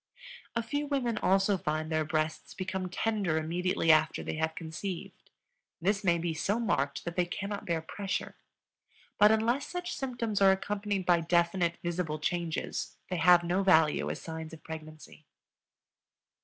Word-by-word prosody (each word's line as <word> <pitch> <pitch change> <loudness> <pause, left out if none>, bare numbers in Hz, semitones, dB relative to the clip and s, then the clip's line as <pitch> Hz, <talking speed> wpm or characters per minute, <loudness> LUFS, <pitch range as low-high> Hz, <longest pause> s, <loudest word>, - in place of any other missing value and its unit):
A 235 - 0
few 290 +5 -2
women 260 -5 0
also 195 +1 +3
find 155 +1 -2
their 155 0 +2
breasts 155 +1 -2
become 185 -1 -3
tender 195 -4 0
immediately 165 +1 +1
after 155 0 +3
they - - -3
have 160 0 -1
conceived; 165 +3 -6 0.5
this 200 +4 +1
may 170 -3 +3
be 170 0 -2
so 195 +8 0
marked 140 -11 -1
that 175 0 -4
they 180 - +2
cannot 200 +2 -4
bear 165 -2 0
pressure. 195 +4 -4 0.8
But 210 +1 +8
unless 230 +5 +1
such 355 0 -4
symptoms 235 -6 -2
are 195 -1 +7
accompanied 200 0 -1
by 175 -1 +4
definite, 170 +1 +1
visible 170 -3 -2
changes, 170 +1 -3
they 180 - 0
have 175 +1 +6
no 175 +3 +1
value 160 -6 +4
as - - -4
signs 160 -1 -7
of 155 - -11
pregnancy. 155 -1 -10
175 Hz, 155 wpm, -30 LUFS, 160-200 Hz, 0.8 s, But